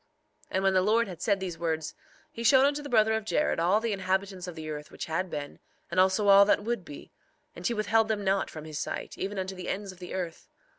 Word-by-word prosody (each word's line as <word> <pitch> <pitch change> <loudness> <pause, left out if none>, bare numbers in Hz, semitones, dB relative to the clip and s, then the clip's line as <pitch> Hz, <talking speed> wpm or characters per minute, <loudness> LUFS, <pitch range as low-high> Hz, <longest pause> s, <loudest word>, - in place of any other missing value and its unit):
3:25 - - -39
And 190 - +1
when 195 0 +3
the 185 - +4
Lord 220 +4 +3
had 180 -4 -9
said 200 -3 +2
these 180 -4 -5
words, 160 -2 -2 0.4
he 230 - -6
showed 260 +3 +6
unto 290 +1 +1
the 290 - -8
brother 220 -2 +4
of 220 0 -1
Jared 220 - 0
all 180 +5 +3
the 225 -1 -1
inhabitants 190 -1 -2
of 175 - -7
the 160 -1 -7
earth 150 -1 -6
which - - -6
had 180 +4 -2
been, 145 -2 -6 0.3
and 175 - +1
also 190 +3 +3
all 200 0 +9
that 205 - +2
would 235 -3 -2
be; 145 -3 -11 0.4
and - - -3
he 235 - -1
withheld 215 +1 +2
them 215 -2 -1
not 195 0 +1
from 155 -1 -9
his 155 -1 -5
sight, - - -4
even 200 +1 -3
unto 190 0 -3
the 185 -1 -6
ends 200 0 -3
of 185 - -16
the 180 0 -7
earth. 175 -3 -5
190 Hz, 255 wpm, -28 LUFS, 175-215 Hz, 0.4 s, all